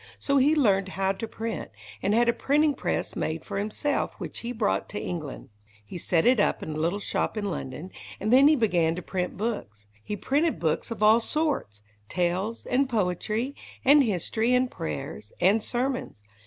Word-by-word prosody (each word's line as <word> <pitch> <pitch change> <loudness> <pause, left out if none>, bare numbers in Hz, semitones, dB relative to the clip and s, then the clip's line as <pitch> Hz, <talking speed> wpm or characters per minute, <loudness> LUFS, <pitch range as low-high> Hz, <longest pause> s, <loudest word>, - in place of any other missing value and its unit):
So 280 0 +1
he 285 +4 +4
learned 195 -9 +3
how 195 0 +2
to 225 +4 -5
print, 225 +1 -5 0.3
and 205 +2 +2
had 235 +1 +4
a 235 - +4
printing 295 +4 +2
press - - -2
made 160 +1 -3
for 195 -1 -3
himself, 215 +8 -1
which - - -6
he 235 - -4
brought 220 -4 0
to 210 - -4
England. 155 -6 -5 0.4
He 175 - -7
set 165 -1 +1
it 250 -2 +5
up - - +1
in - - -5
a 155 - -4
little 170 +5 +1
shop 205 - -2
in 205 -2 -1
London, 150 +4 -6 0.3
and 215 +4 +1
then 270 +2 +8
he 310 - +6
began 175 - +2
to 180 - -6
print 180 -1 -3
books. 190 - -4 0.2
He 210 - -3
printed 295 - +1
books 160 -2 0
of 225 -2 -3
all 215 +2 +7
sorts 250 - -2 0.3
tales, 180 +6 -1
and 265 +1 +1
poetry, 215 - -1 0.3
and 285 +2 +7
history, 225 +3 +1
and 250 0 +1
prayers, 140 - -6
and 200 +5 +4
sermons. 250 - -2
210 Hz, 185 wpm, -27 LUFS, 180-250 Hz, 0.4 s, then